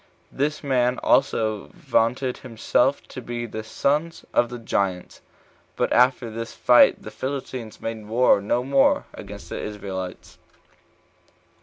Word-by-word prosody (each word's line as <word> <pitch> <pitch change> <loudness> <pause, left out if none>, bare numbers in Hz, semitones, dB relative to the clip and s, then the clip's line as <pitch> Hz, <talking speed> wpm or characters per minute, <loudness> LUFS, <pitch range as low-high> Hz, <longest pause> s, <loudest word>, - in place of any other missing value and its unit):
This 150 +3 -2
man 125 -2 +1
also 110 -5 +2
vaunted 125 +3 0
himself 125 +3 0
to 130 - -7
be 120 0 -5
of 120 - -7
the 110 - -5
sons 150 +9 -1
of 120 - +3
the 125 - -6
giants. 100 -5 -2 0.5
But - - 0
after 125 -2 +3
this 115 +1 -6
fight 125 -1 +5
the - - -8
Philistines 130 -4 -5
made 110 -2 -5
war 115 -2 +4
no 120 +5 0
more 135 +1 +3
against - - -10
the - - -4
Israelites. 95 -3 -6
120 Hz, 135 wpm, -24 LUFS, 110-130 Hz, 0.5 s, fight